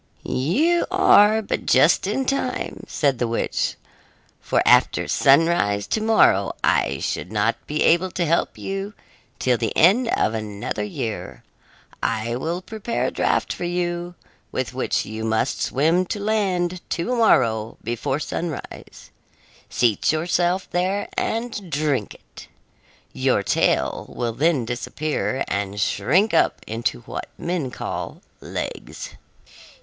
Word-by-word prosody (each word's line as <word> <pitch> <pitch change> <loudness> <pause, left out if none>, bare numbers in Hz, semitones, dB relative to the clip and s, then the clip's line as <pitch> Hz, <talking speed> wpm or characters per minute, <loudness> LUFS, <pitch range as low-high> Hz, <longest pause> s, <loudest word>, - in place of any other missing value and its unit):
"You 295 - +1
are 220 - +5
but - - -3
just 150 +8 +4
in 265 +6 -1
time," 275 +1 -2
said 140 -4 0
the 120 - +1
witch, 115 - -1 0.6
"for - - +1
after - - +4
sunrise 135 -9 +3
to 220 - 0
morrow 215 - +4
I - - +2
should 90 - -3
not 110 +2 +1
be 150 +1 0
able 175 +3 +3
to 175 - 0
help 165 +1 0
you 195 +2 -5 0.4
till 125 -2 +1
the 115 -3 -2
end 210 +9 +5
of 115 - +1
another 105 -1 -4
year. 105 +1 -5 0.6
I 115 +1 -1
will 170 +8 -3
prepare 220 +3 -3
a - - -1
draft - - 0
for - - -6
you, 175 0 -2 0.4
with - - -3
which - - -1
you 110 +1 -6
must 110 +3 0
swim 165 +7 +2
to 205 - -3
land 185 -4 0
to 235 +9 -1
morrow 115 - +2
before 120 +4 -2
sunrise; 160 -2 -6 0.6
seat 115 -4 +2
yourself 175 +3 0
there 190 +3 -1
and 225 -4 -2
drink 145 -7 -1
it. - - -15 0.7
Your - - +1
tail - - +1
will 120 -1 -3
then 140 0 +1
disappear, 130 +3 -2
and 100 +1 -3
shrink 150 - +2
up - - +3
into 110 - -2
what - - -7
men 170 -6 -2
call - - -5 0.2
legs. - - -6
160 Hz, 130 wpm, -22 LUFS, 115-190 Hz, 0.7 s, are